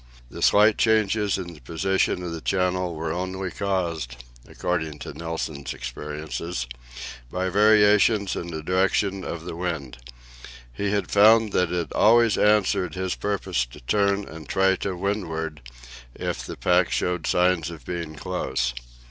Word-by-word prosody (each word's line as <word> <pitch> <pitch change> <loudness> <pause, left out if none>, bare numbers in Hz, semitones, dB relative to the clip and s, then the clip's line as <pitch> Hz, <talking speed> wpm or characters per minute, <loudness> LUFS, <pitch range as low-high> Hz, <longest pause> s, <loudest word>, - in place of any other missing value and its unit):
The - - -8
slight 105 +1 +5
changes 110 -2 +2
in 90 -2 -6
the 75 - -14
position 90 +6 0
of 85 - -4
the 80 -1 -5
channel 90 -2 0
were 80 0 -3
only 95 +1 -3
caused, 85 -10 -2 0.3
according 80 -4 -2
to - - -8
Nilsen's 80 -4 -5
experiences, 75 +2 -5 0.6
by 95 +5 -2
variations 105 0 +4
in 85 - -4
the 80 -2 -6
direction 95 +2 +1
of 85 -1 -5
the - - -5
wind. 80 -8 -4 0.7
He 100 +9 -2
had 100 -2 -1
found 110 +1 +6
that 90 -2 +2
it 85 -2 -2
always 115 +1 +5
answered 105 -5 +2
his 95 0 -1
purpose 95 -8 -1
to - - -13
turn 100 - +1
and 80 -2 -10
try 95 0 +3
to 95 -2 -3
windward, 80 -5 -3 0.5
if - - -4
the - - -7
pack - - +2
showed 90 -2 -1
signs 90 -2 +2
of 85 -2 -10
being 85 -3 -5
close. 65 -8 -2
90 Hz, 150 wpm, -24 LUFS, 80-100 Hz, 0.7 s, found